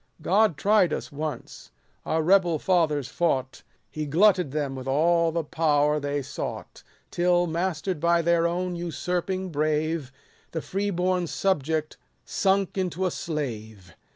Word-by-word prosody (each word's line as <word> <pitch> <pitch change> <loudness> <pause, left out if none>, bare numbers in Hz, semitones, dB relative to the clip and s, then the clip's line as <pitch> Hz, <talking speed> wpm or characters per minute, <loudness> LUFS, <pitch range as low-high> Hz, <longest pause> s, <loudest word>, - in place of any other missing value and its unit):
God 200 -3 +3
tried 195 -2 +3
us - - -4
once; 150 -2 -6 0.4
our 160 0 +1
rebel 175 -2 +4
fathers 155 -6 +1
fought, 135 -4 -1 0.3
He 155 -1 -4
glutted 180 +1 +4
them 145 -1 -2
with 130 0 -7
all 165 +4 +3
the 165 0 -1
power 150 -1 +1
they 145 0 -2
sought: - - -6 0.3
Till, 175 0 +2
master'd 170 0 -2
by 170 +1 +2
their 170 0 +3
own 180 +1 -2
usurping 180 +2 -3
brave, 155 -1 -1 0.4
The 160 - -2
free 200 +2 -2
born 180 -1 0
subject 155 -4 -1 0.3
sunk 195 0 0
into 185 0 -1
a 180 - 0
slave. 110 - -5
165 Hz, 135 wpm, -26 LUFS, 150-180 Hz, 0.4 s, rebel